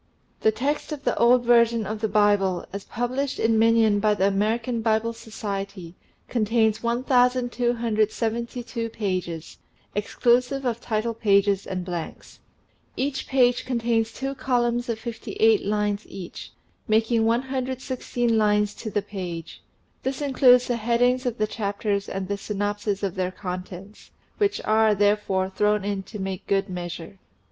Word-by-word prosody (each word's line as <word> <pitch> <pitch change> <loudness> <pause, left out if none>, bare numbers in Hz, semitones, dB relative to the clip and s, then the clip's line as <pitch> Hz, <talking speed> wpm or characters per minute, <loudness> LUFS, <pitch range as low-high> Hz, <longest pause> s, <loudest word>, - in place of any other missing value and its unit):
The 220 - +3
text 285 +8 -2
of 295 -2 -5
the - - +1
old 240 +1 +5
version 235 -2 +4
of 215 +2 -4
the 220 - +1
Bible, 205 -3 +2
as 200 0 -6
published 255 +4 -2
in 225 0 +3
minion 225 -2 +4
by 210 0 +2
the 190 - +1
American 225 +4 0
Bible 225 +1 +1
Society, 200 -6 -6 0.3
contains 220 -1 +1
1272 240 -1 0
pages, 185 -7 -4 0.3
exclusive 245 +6 +1
of 235 -1 -1
title 225 +1 -1
pages 200 -3 +2
and 185 -1 -4
blanks. 175 -3 -6 0.6
Each 270 0 -2
page 245 -2 +3
contains 230 -3 0
two 270 +1 -4
columns 240 -2 0
of 230 - -1
58 400 - +1
lines 210 0 -1
each, 185 -3 -8 0.4
making 225 +1 +2
116 255 -1 -1
lines 210 -1 +2
to 220 - -6
the 205 -1 -1
page. 180 -5 -7 0.4
This 265 0 -3
includes 255 -3 +5
the 245 - -1
headings 245 +3 +2
of 245 -1 -2
the 215 - +1
chapters 205 -1 -2
and 195 -1 -4
the 200 +1 -3
synopses 205 0 -2
of 195 -3 -1
their 185 -1 -1
contents, 185 +2 -8 0.3
which 405 -1 +1
are, 220 0 +4
therefore, 205 -2 +1
thrown 210 0 +1
in 200 -1 -1
to 215 - -7
make 190 -2 -5
good 195 0 +1
measure. 175 +1 -6
220 Hz, 140 wpm, -24 LUFS, 200-240 Hz, 0.6 s, old